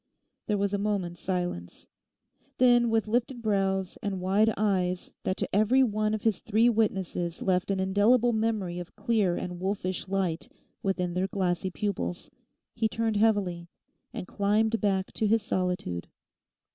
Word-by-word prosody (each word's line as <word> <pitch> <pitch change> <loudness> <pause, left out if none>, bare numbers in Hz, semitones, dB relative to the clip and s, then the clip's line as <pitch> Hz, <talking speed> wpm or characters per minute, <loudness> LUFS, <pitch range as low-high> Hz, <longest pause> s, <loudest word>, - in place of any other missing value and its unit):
There 210 - +1
was 200 0 0
a 200 - 0
moment's 195 -4 -2
silence. 175 - -4 0.7
Then 240 -2 +5
with 225 -1 +1
lifted 240 +2 -1
brows 195 -3 0
and 200 -2 -2
wide 200 +4 +3
eyes 185 -3 0
that 185 - 0
to - - -2
every 225 +6 +4
one 215 -2 +1
of 215 - -6
his 220 -4 +1
three 225 +2 +3
witnesses 190 -6 -1
left 185 -1 +1
an 195 -1 0
indelible 215 +6 +3
memory 215 -6 -1
of 175 - -9
clear 210 -4 +1
and 180 -1 -5
wolfish 190 -1 -2
light 185 -4 -1 0.3
within 180 -2 -1
their 185 +2 0
glassy 185 -1 -1
pupils, 185 -2 -3 0.4
he 225 -1 +1
turned 225 0 -1
heavily, 200 -6 +1 0.4
and 225 -6 -6
climbed 215 +2 +1
back 195 -3 0
to 220 - 0
his 225 0 +2
solitude. 180 - -2
200 Hz, 150 wpm, -28 LUFS, 185-220 Hz, 0.7 s, Then